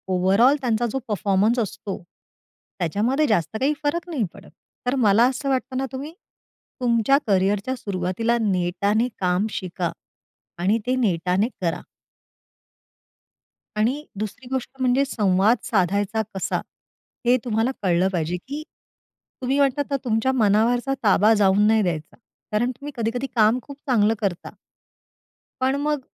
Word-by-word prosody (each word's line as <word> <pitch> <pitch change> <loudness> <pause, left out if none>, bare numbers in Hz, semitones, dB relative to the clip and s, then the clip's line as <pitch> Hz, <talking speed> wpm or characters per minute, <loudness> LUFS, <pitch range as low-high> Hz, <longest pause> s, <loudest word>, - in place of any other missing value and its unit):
Overall 195 +9 +4
त्यांचा 240 -2 +1
जो 270 - -1
performance 210 +2 +1
असतो 205 -2 -4 0.8
त्याच्यामध्ये 225 - +1
जास्त 210 -1 0
काही 280 +3 +2
फरक 335 +4 -1
नाही 290 -9 -1
पडत. - - -14 0.4
तर 250 +2 +1
मला 225 -3 +4
असं 275 +2 -3
वाटत 260 0 -1
ना, 265 +1 0
तुम्ही 280 +4 -6 0.7
तुमच्या 240 +2 +3
कॅरियर 195 0 +2
च्या 260 - -1
सुरुवातीला 200 +2 -1
नेटाने 200 +3 +1
काम 185 +2 +1
शिका. 180 -3 -3 0.7
आणि 190 +6 +2
ते 255 - +2
नेटाने 190 -3 +1
करा. 170 -2 -1 2.0
आणि 250 +8 0
दुसरी 215 +4 -5
गोष्ट 260 -2 -2
म्हणजे 255 +2 +3
संवाद 210 -3 +2
साधायचा 200 +2 +1
कसा? 190 -1 -1 0.7
हे 245 +1 +5
तुम्हाला 225 +1 +1
कळलं 180 -1 +2
पाहिजे, 170 0 -1
की 280 - -7 0.8
तुम्ही 265 +2 +1
म्हणतात 280 0 +2
ना, 280 - +2
तुमच्या 230 +2 +1
मनावरचा 240 +3 +2
ताबा 210 0 +5
जाऊ 200 -3 +4
नाही 215 +1 +4
द्यायचा. 165 -5 -3 0.4
कारण 230 +4 +1
तुम्ही 280 +4 -8
कधी-कधी 235 +3 -1
काम 220 +2 +4
खूप 280 +4 -11
चांगलं 220 -3 +3
करता. 195 -5 -2 1.1
पण 260 +1 +2
मग 295 0 0
220 Hz, 135 wpm, -23 LUFS, 195-255 Hz, 2.0 s, हे